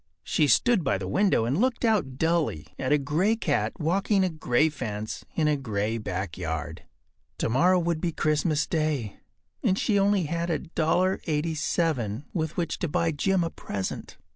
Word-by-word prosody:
She 150 - +2
stood 215 - +4
by 100 - +1
the 95 -1 -5
window 190 - +2
and 135 +8 0
looked 255 -1 +1
out 195 - +1
dully 160 - 0
at 130 - -1
a 150 - +6
gray 155 +10 +1
cat 225 - 0
walking 190 +5 +2
a 185 - +2
gray 155 -2 +2
fence 110 -8 -5
in 155 -2 +2
a 150 - +3
gray 110 -4 -2
backyard. 85 -5 -4 0.5
Tomorrow 170 +11 +3
would 170 -2 0
be 175 - 0
Christmas 155 0 +1
Day, 155 -10 -1 0.4
and 190 - +2
she 210 -1 +1
had - - +4
only 200 -1 +3
$1.87 160 - 0
with 160 -2 -2
which 170 -3 -2
to 175 - -1
buy 165 +2 +1
Jim 180 +4 +1
a 165 - -2
present. 95 -2 -5
155 Hz, 160 wpm, -26 LUFS, 125-175 Hz, 0.5 s, a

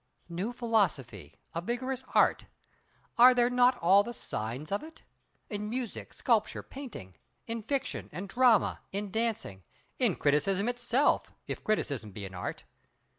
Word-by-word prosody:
New 180 +7 -3
philosophy—a 170 - -1
vigorous 255 +5 -3
Art! - - +4 0.7
Are 250 +1 +9
there 245 0 +3
not 250 0 +4
all 190 +4 +7
the 240 +3 -5
signs 120 - -5
of 200 - 0
it? 320 +1 -13 0.4
In 210 -1 -4
music, 245 -1 -4
sculpture, 225 -4 +1
painting; 235 - -9 0.3
in 230 0 -3
fiction—and 245 -6 -3
drama; 240 +1 +3
in 200 0 -3
dancing; 220 - -2 0.4
in - - +3
criticism 185 +8 +2
itself, 245 +3 +1
if - - -5
criticism 140 - -1
be 100 0 -6
an 95 - -9
Art. 90 - -5
215 Hz, 130 wpm, -30 LUFS, 165-245 Hz, 0.7 s, Are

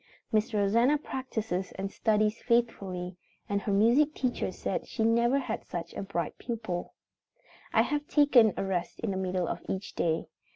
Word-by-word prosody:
Miss 220 +3 +2
Rosanna 230 +7 +3
practices 225 -9 -3
and 195 +1 -4
studies 215 0 +1
faithfully, 195 -7 0 0.3
and 200 0 0
her 205 - -2
music 240 +10 +4
teacher 255 -2 -1
says - - -3
she 225 - -1
never 235 +3 +3
had 250 -5 -3
such 170 -1 -6
a - - -4
bright 190 -5 -3
pupil. 220 -7 -4 0.8
I - - +5
have 295 0 -1
her - - -36
take 290 -2 +3
a 220 -5 +6
rest 185 -3 -2
in 225 - -1
the 190 - -2
middle 185 -2 -1
of - - -3
each 190 +2 -3
day. 160 -1 0
215 Hz, 170 wpm, -29 LUFS, 190-240 Hz, 0.8 s, a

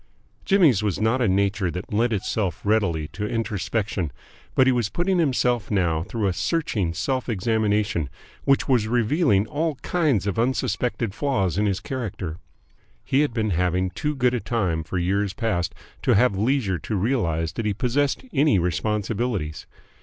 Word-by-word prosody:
Jimmy's 165 - +4
was 105 -4 -1
not 110 +4 +2
a 120 - +3
nature 100 0 +1
that 90 +4 -6
lent 115 +3 +2
itself 100 -2 -1
readily 100 -8 +1
to 105 0 -4
introspection, 105 -5 -2 0.4
but 130 - +5
he 130 - +4
was 120 -4 0
putting 180 +1 0
himself 125 - +1
now 85 -6 +1
through 105 +5 -3
a 95 - +1
searching 110 - -1
self 130 -2 -1
examination 105 - 0 0.3
which 135 0 +2
was 120 -6 +2
revealing 120 - +2
all 150 +6 -1
kinds 150 - +1
of 100 +1 -1
unsuspected 120 -3 0
flaws 105 -7 0
in 105 - +2
his 100 -1 0
character. 105 - -5 0.7
He 135 - +2
had 150 -2 +2
been 110 -3 -1
having 90 +1 +1
too 150 - -2
good 125 -2 +2
a 125 - 0
time 95 -10 -1
for 85 +4 -4
years 100 +3 0
past 90 -7 -1 0.3
to - - +3
have 120 0 +4
leisure 105 -4 +1
to 110 - -4
realise 90 -7 0
that 110 +4 -3
he 105 - +1
possessed 135 - 0
any 145 -5 +4
responsibilities. 100 -1 -1
110 Hz, 160 wpm, -24 LUFS, 95-125 Hz, 0.7 s, but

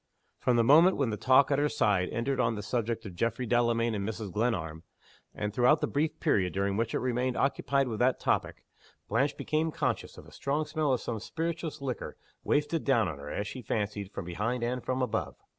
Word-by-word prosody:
From 125 - +2
the 115 - +4
moment 165 +9 +6
when 135 -5 +1
the - - -1
talk 130 +5 +4
at 140 - +3
her 150 +1 +2
side 95 -8 +1
entered 130 +3 -1
on 115 -1 +2
the 105 - -5
subject 115 +1 -2
of 95 - -7
Geoffrey 115 +6 -1
Delamayn 115 -1 +2
and 100 -2 -2
Mrs. 110 -3 -5
Glenarm 85 -8 -1 0.5
and 105 -1 -4
throughout 125 +7 +4
the - - +1
brief 155 +2 -1
period 95 - +1
during 100 0 0
which 115 +1 -1
it - - +3
remained 125 0 -1
occupied 140 0 +1
with 110 -3 -4
that 125 +1 +2
topic - - -1 0.4
Blanche 135 +7 +1
became 155 +1 0
conscious 135 -8 -2
of - - -11
a - - -15
strong 145 +3 -1
smell 150 -2 0
of 125 - +1
some 115 -2 -3
spirituous 165 +4 -4
liquor 130 -3 -4 0.3
wafted 150 +2 +1
down 120 -7 +3
on 75 -5 -5
her, 70 +1 -8
as 100 - -3
she 130 +6 -6
fancied, 105 -3 -3
from 100 - -6
behind 110 +8 -2
and 125 +1 -2
from 130 0 -1
above. 125 - -2
120 Hz, 210 wpm, -29 LUFS, 105-140 Hz, 0.5 s, moment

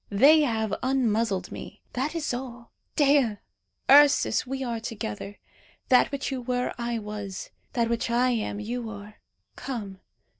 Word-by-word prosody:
They 280 +10 +6
have 220 -6 0
unmuzzled 230 -6 0
me. - - -9
That 275 +6 -2
is 315 -6 -2
all. 245 -1 -7 0.2
Dea! 280 -7 +3 0.5
Ursus! 285 -1 +5
we 270 +1 -3
are 235 -2 -2
together. 205 - -6 0.5
That 255 +3 +5
which 280 0 -3
you 260 -2 -3
were, 250 0 -1
I 235 0 -1
was; 210 -3 -6 0.2
that 235 -2 +1
which 235 0 -1
I 245 +2 +3
am, 215 -3 -2
you 230 +2 -4
are. 210 0 -10 0.4
Come. 205 -8 -6
235 Hz, 145 wpm, -26 LUFS, 215-265 Hz, 0.5 s, They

